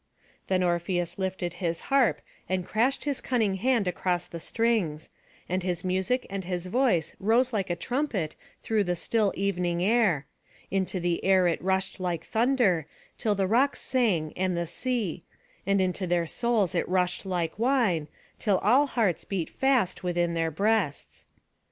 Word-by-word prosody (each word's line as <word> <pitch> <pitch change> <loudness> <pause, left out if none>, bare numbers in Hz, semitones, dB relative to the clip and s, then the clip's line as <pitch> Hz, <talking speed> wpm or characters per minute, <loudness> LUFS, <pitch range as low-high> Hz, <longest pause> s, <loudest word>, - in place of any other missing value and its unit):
Then 185 -1 +2
Orpheus 175 +1 -1
lifted 190 -2 -2
his 170 -2 -1
harp, 270 -4 +3 0.3
and 185 -1 -1
crashed 245 +10 0
his 285 -3 -2
cunning 220 -7 0
hand 235 -1 +1
across 180 0 -1
the 170 - -8
strings; 195 -8 -1 0.4
and 185 +1 -1
his 180 -1 -2
music 190 +7 0
and 195 -1 -4
his 180 0 -3
voice 185 - +1
rose 235 +5 +2
like 195 -4 -1
a 175 - 0
trumpet 215 - -2 0.3
through 220 -2 +1
the 180 0 0
still 210 +3 +1
evening 180 -3 0
air; 200 - +2 0.5
into 190 -1 0
the 175 -1 -1
air 190 -2 +4
it 170 - 0
rushed 190 +1 0
like 175 -3 -2
thunder, 225 - +2 0.3
till 210 -2 +1
the 195 -1 +1
rocks 255 +7 +1
rang 190 -12 +2
and 185 -1 0
the 170 - -1
sea; 220 -3 -2 0.5
and 200 0 +3
into 185 0 0
their 175 -1 +1
souls 220 0 0
it 175 - -1
rushed 180 -1 +1
like 180 -1 -2
wine, 230 - +2 0.3
till 200 -3 +2
all 255 +8 +4
hearts 215 - 0
beat 185 -5 -3
fast 255 -9 +1
within 175 -2 0
their 165 -1 0
breasts. 195 -2 -1
190 Hz, 160 wpm, -27 LUFS, 175-225 Hz, 0.5 s, air